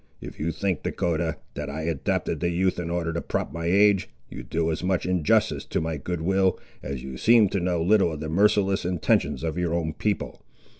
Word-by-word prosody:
If - - -10
you 80 +3 -1
think, 90 -2 -2
Dahcotah, 80 -2 -1 0.2
that - - -5
I 80 +3 -4
adopted 80 -4 -1
the 85 - 0
youth 90 +2 0
in 85 -1 -3
order 85 -1 -1
to 85 - -2
prop - - -3
my 85 +1 -3
age, 100 +1 +4 0.2
you - - -7
do 80 +7 -1
as 80 - -3
much 90 -1 0
injustice 90 -4 +2
to - - -1
my 80 -1 -2
goodwill, 90 +5 0 0.2
as 70 -2 -5
you 65 -1 -7
seem 110 - +5
to 100 - -1
know 90 -2 0
little 95 -1 +4
of 75 - -6
the 80 - -4
merciless 100 +3 +2
intentions 80 -5 0
of 80 +1 -2
your 85 -1 0
own 80 -2 -1
people. 105 +5 -3
85 Hz, 205 wpm, -25 LUFS, 80-95 Hz, 0.2 s, seem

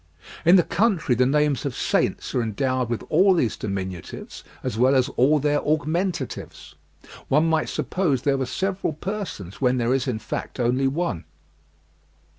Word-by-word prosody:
In 175 +3 +7
the 180 - +6
country 195 - +1
the 125 +1 +3
names 150 -1 +1
of 140 -4 -3
saints - - 0
are 125 - +1
endowed 125 +2 -1
with 120 - -2
all 185 +4 +5
these 120 -10 +1
diminutives 95 -3 -6 0.2
as - - -2
well 130 +4 +4
as 130 -1 +3
all 140 +5 +3
their 145 0 +1
augmentatives. 155 - -2 0.5
One 150 +4 +3
might 160 -1 +1
suppose 150 -9 -1
there 140 -1 +2
were 130 - -1
several 190 +4 -2
persons 150 - -6
when 125 -1 +3
there 120 +1 +1
is, 135 0 0
in 125 -4 -1
fact, 110 - -6
only 125 +3 +2
one. 140 - -2
135 Hz, 160 wpm, -24 LUFS, 125-160 Hz, 0.5 s, In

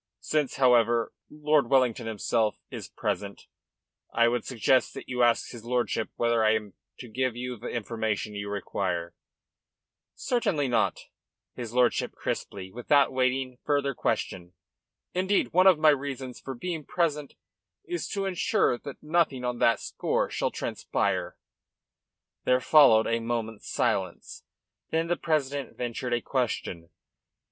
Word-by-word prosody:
Since, 150 -3 0
however, 120 -3 +3 0.2
Lord 150 -3 +1
Wellington 125 -3 +2
himself 110 0 0
is - - -6
present, - - -4 0.7
I 115 0 +4
would 120 0 -1
suggest 130 +1 +2
that - - -8
you 125 -1 -2
ask 120 -1 +3
his 115 -2 -10
lordship 120 -2 -1
whether 115 -1 +2
I 110 0 +4
am 105 -3 -4 0.2
to 125 - -9
give 125 +1 -1
you 125 +1 -4
the 115 +2 -8
information 110 -2 -2
you 100 0 -5
require." 90 -4 -3 1.0
"Certainly 200 - 0
not," 120 - +2
said - - -15 0.5
his 120 -2 -7
lordship 125 -1 +2
crisply, 95 -2 -4
without 135 +5 +3
awaiting 130 0 0
further 140 -2 +1
question. 90 -6 -2 0.6
"Indeed, 190 +1 +1
one 185 +2 +6
of 185 -4 +7
my 155 0 +5
reasons 135 -3 -2
for 135 - -6
being 165 +4 -4
present 150 -3 -1 0.5
is 350 -2 -3
to 200 -2 -2
ensure 180 -9 +1
that 140 - -9
nothing 155 -5 +1
on 125 -1 -2
that 115 -2 +4
score - - -1
shall - - 0
transpire." - - -2 1.1
There 125 0 +3
followed 130 -6 +6
a 115 0 +1
moment's 115 -2 -4
silence. - - -2 0.4
Then 165 +1 0
the 175 - +2
president 145 -4 -2
ventured 120 +1 -3
a 120 - -2
question. 110 -11 -2
125 Hz, 140 wpm, -27 LUFS, 115-145 Hz, 1.1 s, of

